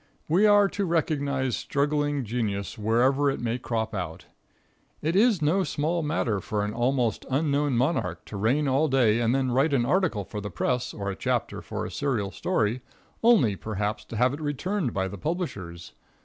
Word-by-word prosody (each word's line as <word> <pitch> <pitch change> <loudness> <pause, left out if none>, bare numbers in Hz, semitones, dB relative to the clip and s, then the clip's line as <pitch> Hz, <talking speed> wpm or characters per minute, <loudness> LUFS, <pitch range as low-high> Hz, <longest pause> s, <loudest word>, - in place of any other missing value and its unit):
We 185 +7 +4
are 205 -1 +6
to 200 - -2
recognize 140 -6 0
struggling 145 0 0
genius 105 -3 -2
wherever 125 +6 +2
it 135 - -2
may 120 +1 -2
crop 110 -2 -2
out. 90 -5 -5 0.8
It 160 +3 0
is 205 -5 +4
no 180 +6 +3
small 160 +2 -1
matter 145 -9 0
for 105 +2 -2
an 105 - -4
almost 120 -2 0
unknown 140 -1 +1
monarch 115 - 0
to - - -9
reign 125 +9 +1
all 135 +4 +2
day 120 -5 +3
and 120 +2 +2
then 130 -2 0
write 135 +5 +2
an 120 -3 +2
article 165 - +1
for 105 - -6
the 105 - -5
press 125 +5 -1
or 100 -1 -4
a - - -5
chapter - - -2
for - - -5
a - - -6
serial 115 -9 -1
story, 110 +5 0 0.4
only, 215 - +4
perhaps, 105 +1 -3
to 115 - -7
have 125 +3 +3
it 145 - -6
returned 155 - -1
by 95 -2 -1
the 100 0 -8
publishers. 100 - -4
130 Hz, 180 wpm, -26 LUFS, 105-150 Hz, 0.8 s, are